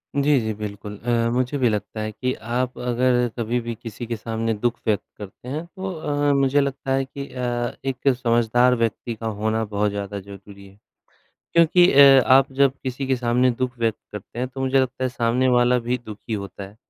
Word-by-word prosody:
जी, 140 0 +3
जी, 110 -1 -2
बिल्कुल 105 0 -7
अ, 115 +1 0
मुझे 125 +3 0
भी 125 -3 +2
लगता 105 +1 -3
है 110 0 -3
कि 125 +4 -2
आप 120 +3 -3
अगर 125 0 +1
कभी 120 +1 -1
भी, 120 0 -4
किसी 115 +1 -8
के 120 - -2
सामने 115 0 -2
दुख 120 +3 -1
व्यक्त 105 -3 +1
करते 105 +4 -11
हैं, 150 +6 -4
तो 190 +2 -6
अ, 145 -3 0
मुझे 140 +1 +3
लगता 140 -1 -3
है 135 0 +1
कि 140 +1 -8
अ, 120 -1 -2
एक 135 0 -3
समझदार 120 +1 +3
व्यक्ति 115 0 -2
का 115 +1 -5
होना 110 +1 0
बहुत 105 0 0
ज़्यादा 100 0 -4
ज़रूरी 100 0 -12
है, 95 +1 -19 0.8
क्योंकि 170 +2 +5
अ, 135 -1 +8
आप 135 +1 +5
जब 135 0 +3
किसी 130 +1 -4
के 130 0 +1
सामने 125 +1 +2
दुख 130 -1 -2
व्यक्त 115 -2 0
करते 105 +3 -9
हैं, 125 +1 -1
तो 135 +1 -8
मुझे 135 0 +2
लगता 130 0 -2
है, - - +1
सामने 125 +1 +1
वाला 125 0 +4
भी 120 +1 -2
दुखी 110 +1 -8
होता 100 -1 -5
है। 100 +2 -14
120 Hz, 200 wpm, -23 LUFS, 110-130 Hz, 0.8 s, अ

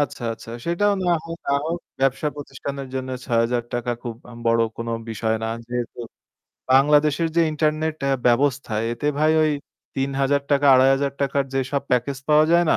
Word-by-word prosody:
আচ্ছা, 145 -3 -2
আচ্ছা। 115 - -12 0.2
সেটাও 200 +5 +2
না 175 - +2
হোক, 165 0 -7
না - - +2
হোক, 170 +2 -2 0.2
ব্যবসাপ্রতিষ্ঠানের 140 0 -2
জন্য 130 0 -3 0.2
৳৬,০০০ 120 +1 0
খুব 120 -3 -5
আম 115 - -11
বড় 115 0 +4 0.2
কোনো 115 0 -4 0.2
বিষয় 110 0 -1
না। 110 - -1 0.2
যেহেতু 120 0 -4 0.7
বাংলাদেশের 150 +4 +4
যে - - +5
ইন্টারনেট 155 +1 0
অ্যা 140 - +2
ব্যবস্থা, 130 0 +2 0.2
এতে 120 +5 -3
ভাই 155 +1 +4
ওই 155 - +3 0.4
৳৩,০০০, 140 +1 +1
৳২,৫০০ 135 +1 +2
র - - -11
যেসব 135 +1 -1
প্যাকেজ 125 +2 +1
পাওয়া 150 0 +6
যায় 170 0 +5
না? - - +4
140 Hz, 155 wpm, -23 LUFS, 125-150 Hz, 0.7 s, পাওয়া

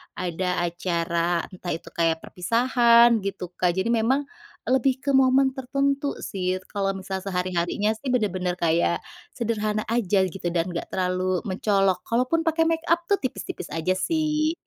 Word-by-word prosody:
ada 180 0 -3 0.2
acara 170 0 -1
entah 180 -1 -6
itu 165 - -11
kayak 165 -1 0
perpisahan 235 +3 +4
gitu 195 -3 -5
Kak, 175 -1 +2
jadi 190 +5 0
memang 240 +5 +2 0.4
lebih 260 0 +1
ke 285 - -2
momen 265 0 +4
tertentu 275 +2 0
sih. 185 -1 -2
Kalau 195 -1 -1
misal 190 0 -4
sehari-harinya 180 +1 -1
sih 255 +2 -3
benar-benar 185 -6 0
kayak 170 +1 +2 0.3
sederhana 215 -2 -1
aja 210 -4 +2
gitu, 180 0 -5
dan 170 +1 0
enggak 170 -1 -4
terlalu 185 0 0
mencolok 195 -1 +1
kalaupun 255 +8 +1
pakai 325 0 +2
makeup 330 +1 +1
tuh 400 - +4
tipis-tipis 245 -8 -5
aja 165 +3 0
sih. 310 - 0
200 Hz, 145 wpm, -25 LUFS, 180-255 Hz, 0.4 s, perpisahan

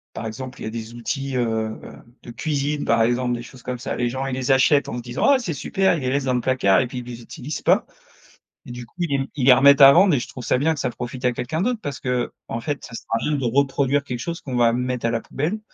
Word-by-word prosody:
par - - -5
exemple, 125 +4 -8
il - - -5
y - - -4
a - - -4
des 115 0 -7
outils, 135 +3 -4
heu 125 - +2 0.4
heu, - - -11 0.3
de 120 - -9
cuisine, 145 +2 -2
par 115 0 +3
exemple, 120 +1 +1
des 120 - -6
choses 125 -1 -14
comme 125 0 -4
ça, - - -4
les 120 - 0
gens, 130 +2 -3
ils 135 - -3
les 130 +1 -3
achètent 135 +2 +4
en - - -5
se - - -4
disant: 120 0 -2
«Ah! 270 - +4
C'est 200 -10 -3
super!», 190 +5 +1
ils - - -5
les 130 - -1
laissent 140 +1 0
dans 130 - 0
le 125 - +1
placard 105 -8 +3
et 125 - 0
puis 125 +1 -6
ils 120 - -8
les 120 -1 -8
utilisent 130 +5 -7
pas - - +3 0.8
et - - -10
du 120 -1 -7
coup, - - -32
ils 170 -4 -1
les 135 - -3
ils 135 -4 -1
les 135 - +9
remettent 140 +3 +6
à 135 0 +11
vendre 180 +1 +5
et 130 - +1
je - - -5
trouve 125 - -9
ça - - +2
bien 155 +5 +2
que 150 - -5
ça - - 0
profite 125 +1 -7
à 125 - +3
quelqu'un 130 +7 -3
d'autre 235 +2 0
parce 140 -2 -5
qu'en 125 -2 -3
fait, 145 +4 -4
ça 115 - -10
sert - - -8
à 115 - +2
rien 150 - -2
de 135 - -3
reproduire 140 +2 +1
quelque 125 -3 -5
chose 170 +5 -4
qu'on 130 -3 -5
va 120 -1 +4
mettre 125 0 -2
à - - +1
la 115 - -1
poubelle, 160 - -3
130 Hz, 300 wpm, -22 LUFS, 120-140 Hz, 0.8 s, à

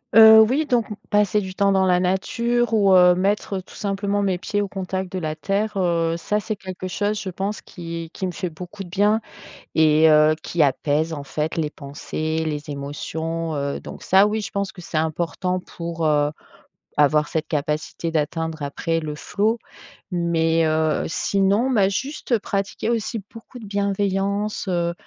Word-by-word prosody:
Heu, 220 0 +10
oui 260 +8 +3
donc 245 -6 +1
m 210 - -5 0.2
passer 210 0 +3
du 190 -2 -5
temps 200 +1 +2
dans 190 -1 +3
la 180 -1 +3
nature 235 +6 0
ou 200 -3 +4
heu, 180 -1 +7
mettre 195 +1 0
tout 185 - -14
simplement 200 0 -1
mes 190 -3 0
pieds 205 - -2
au 205 - 0
contact 190 -1 -4
de 185 - -3
la 155 -2 -3
terre, 200 +6 -1
heu, 170 -3 +1
ça 210 +5 -1
c'est 215 +1 -3
quelque 185 -1 -7
chose 205 +3 -1
je 190 - -4
pense 195 +3 -3
qui 165 -2 -7
qui 190 - -4
me 185 - -2
fait 180 +1 -4
beaucoup 180 +5 -8
de 180 - -12
bien 205 +4 +2 0.5
et 155 0 +5
heu, 155 0 +6
qui 170 -3 +1
apaise 150 +3 +1
en 145 -3 -5
fait 150 +3 -3
les 155 -2 0
pensées, 155 +3 -4
les 150 0 -4
émotions, 160 +3 -4
heu, 140 0 -2
donc - - -9
ça 190 +2 +5
oui 210 +1 0
je 210 - -5
pense 200 -1 -2
que 190 - -14
c'est 165 - -4
important 170 +3 -1
pour, 170 -2 -5
heu, 150 -1 +2 0.7
avoir 150 +1 +4
cette 160 - -2
capacité 150 +2 -2
d'atteindre 160 +1 -2
après 165 +4 -1
le 155 -2 -5
flow, 210 +9 0 0.5
mais 165 -2 +1
heu, 155 0 +1
sinon, 200 +8 +1
bah, 200 -6 +3
juste 260 +3 -1
pratiquer 200 +2 -2
aussi 230 0 -1
beaucoup 230 +2 -11
de 230 - -9
bienveillance, 200 +1 -1
heu, 170 -2 0
185 Hz, 180 wpm, -22 LUFS, 160-205 Hz, 0.7 s, Heu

